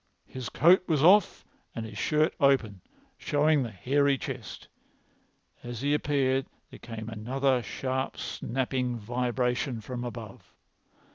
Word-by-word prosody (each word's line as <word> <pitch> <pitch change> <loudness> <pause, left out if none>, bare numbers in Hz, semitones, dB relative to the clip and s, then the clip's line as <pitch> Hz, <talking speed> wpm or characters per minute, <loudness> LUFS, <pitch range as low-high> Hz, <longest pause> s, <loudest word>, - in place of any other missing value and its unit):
His 130 -4 -7
coat 175 +5 +5
was 150 -4 +1
off 190 +3 +5 0.3
and 115 - -4
his 110 -1 -9
shirt 155 +6 +2
open, 125 - +2 0.4
showing 150 0 +2
the 120 - -2
hairy 140 +7 +1
chest. 130 -5 -7 0.9
As 120 -1 -7
he 145 +1 +1
appeared 135 -3 +1 0.2
there - - -11
came 115 -2 -8
another 125 +4 0
sharp 130 +2 -3
snapping 125 0 -2
vibration 125 +2 -1
from 120 +2 -6
above. 115 -4 -9
130 Hz, 125 wpm, -28 LUFS, 120-140 Hz, 0.9 s, coat